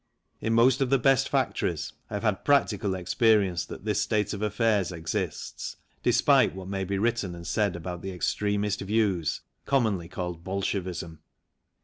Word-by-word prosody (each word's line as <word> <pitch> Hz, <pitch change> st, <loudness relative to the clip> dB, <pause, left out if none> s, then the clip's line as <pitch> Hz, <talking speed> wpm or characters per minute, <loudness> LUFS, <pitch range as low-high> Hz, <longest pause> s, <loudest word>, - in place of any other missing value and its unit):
In 110 Hz, +1 st, -1 dB
most 125 Hz, +3 st, +4 dB
of 135 Hz, -, +2 dB
the 135 Hz, -, +4 dB
best 135 Hz, 0 st, +3 dB
factories -, -, -1 dB, 0.2 s
I 105 Hz, -, -4 dB
have 105 Hz, -, -3 dB
had 105 Hz, -4 st, 0 dB
practical 105 Hz, -8 st, +2 dB
experience 95 Hz, -2 st, +2 dB
that 95 Hz, -, -9 dB
this 105 Hz, -1 st, +1 dB
state 105 Hz, -2 st, 0 dB
of 100 Hz, -, -5 dB
affairs 105 Hz, -3 st, +1 dB
exists, 85 Hz, 0 st, -4 dB, 0.2 s
despite -, -, +4 dB
what 95 Hz, -1 st, -7 dB
may 95 Hz, 0 st, -2 dB
be 100 Hz, +1 st, -2 dB
written 105 Hz, -4 st, 0 dB
and 85 Hz, 0 st, -9 dB
said 100 Hz, -2 st, 0 dB
about 85 Hz, 0 st, -6 dB
the 95 Hz, -, -5 dB
extremist 100 Hz, +2 st, -1 dB
views, 100 Hz, -5 st, 0 dB, 0.3 s
commonly 110 Hz, -11 st, +1 dB
called 90 Hz, -2 st, -5 dB
Bolshevism. 90 Hz, -4 st, -3 dB
100 Hz, 155 wpm, -27 LUFS, 90-110 Hz, 0.3 s, most